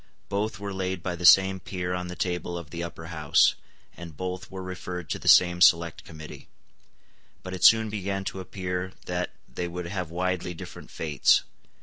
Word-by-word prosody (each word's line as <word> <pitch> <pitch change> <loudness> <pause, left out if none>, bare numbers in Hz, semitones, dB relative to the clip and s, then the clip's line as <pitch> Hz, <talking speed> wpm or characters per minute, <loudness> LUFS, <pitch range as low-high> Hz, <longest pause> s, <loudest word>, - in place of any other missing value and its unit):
Both 105 +2 -1
were 100 -1 -5
laid 95 -2 -3
by 90 -2 -2
the 90 0 +3
same 95 +2 +6
peer 90 0 -4
on 90 0 -3
the 90 - -6
table 90 -1 -2
of 80 -4 -9
the 85 - -5
Upper 85 -1 -7
House; 75 -2 +4 0.4
and 85 -4 -10
both 95 +1 -5
were 95 -1 -7
referred 90 -2 -6
to - - -2
the - - -9
same 90 -1 +6
select 85 -1 +4
committee. 80 -1 -11 1.0
But 95 - -6
it 95 - -5
soon 110 -1 +6
began 100 -1 -3
to 95 - -5
appear 90 0 -4
that 90 0 -2 0.2
they 90 - -4
would 90 0 -5
have 90 -1 -4
widely 90 0 -2
different - - -10
fates. 75 -4 +2
90 Hz, 185 wpm, -26 LUFS, 85-95 Hz, 1.0 s, same